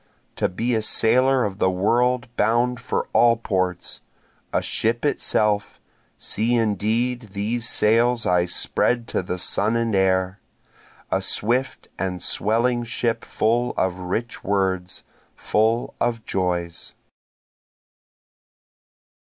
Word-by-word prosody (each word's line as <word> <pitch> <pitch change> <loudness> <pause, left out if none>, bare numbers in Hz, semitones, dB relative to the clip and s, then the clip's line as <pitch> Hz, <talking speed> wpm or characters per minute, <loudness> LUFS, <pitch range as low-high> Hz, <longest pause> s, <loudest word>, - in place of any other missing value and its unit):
To - - +1
be 115 +7 -1
a 110 - +1
sailor 125 +4 +3
of 100 -2 -3
the 95 - +3
world 120 +7 +1
bound 120 +3 +1
for 125 - -2
all 120 -1 +5
ports, 95 -5 -2 0.5
A - - +2
ship 115 +4 -1
itself, 105 -7 0 0.4
(see 115 +3 0
indeed 115 +1 -1
these 115 +4 -1
sails 115 +2 +3
I 90 -1 +3
spread 120 +6 0
to - - 0
the 90 0 -4
sun 105 +5 0
and 115 -1 0
air,) 95 0 +1 0.7
A - - +1
swift 125 +5 0
and 90 -1 -3
swelling 120 +3 +1
ship 115 0 -2
full 120 +3 0
of 95 -1 0
rich 100 +6 -4
words, 95 -2 -1 0.3
full 110 +3 0
of 115 -2 -1
joys. 90 -2 -2
110 Hz, 115 wpm, -23 LUFS, 95-120 Hz, 0.7 s, all